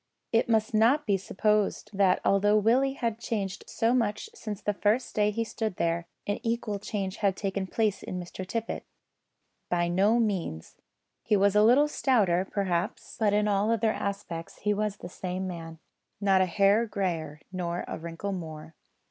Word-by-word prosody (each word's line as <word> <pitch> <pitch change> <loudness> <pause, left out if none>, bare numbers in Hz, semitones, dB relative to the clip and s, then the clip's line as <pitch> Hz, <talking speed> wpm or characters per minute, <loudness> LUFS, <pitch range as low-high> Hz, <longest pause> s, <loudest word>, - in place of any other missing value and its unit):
It 230 +1 +2
must 220 0 +2
not 235 +8 +4
be 205 -3 +2
supposed 210 +2 0
that 190 -2 +3
although 205 +2 +4
Willie 250 +6 +3
had 230 -4 -2
changed 205 -5 -3
so 230 +2 +1
much 230 - 0
since 215 - -6
the 210 -1 -1
first 215 +5 +1
day 210 -1 +3
he 230 +2 -1
stood 220 -2 -3
there, 170 0 -1 0.2
an 205 - -1
equal 230 -3 -2
change 195 -2 -3
had 195 -3 +1
taken 195 -1 -2
place 215 0 0
in 180 - -5
Mr 180 +1 -7
Tippet. 225 +4 -3 0.9
By 175 -1 +1
no 200 +6 +3
means. 190 - -2 0.4
He 210 - +2
was 200 +1 +3
a 210 - +6
little 250 +7 +6
stouter, 200 -11 +2
perhaps, 185 -2 -2
but 215 -2 +3
in 210 +1 +2
all 205 +1 +2
other 230 -1 +2
respects 200 -6 -5
he 210 0 +2
was 210 0 -1
the 175 - -8
same 185 +1 -4
man. 165 -2 -7 0.4
Not 195 -2 +4
a 185 - +3
hair 200 +5 +3
greyer, 165 -7 -2
nor 175 -2 -3
a - - -5
wrinkle 170 +4 -5
more. 160 -3 -7
200 Hz, 175 wpm, -28 LUFS, 185-220 Hz, 0.9 s, a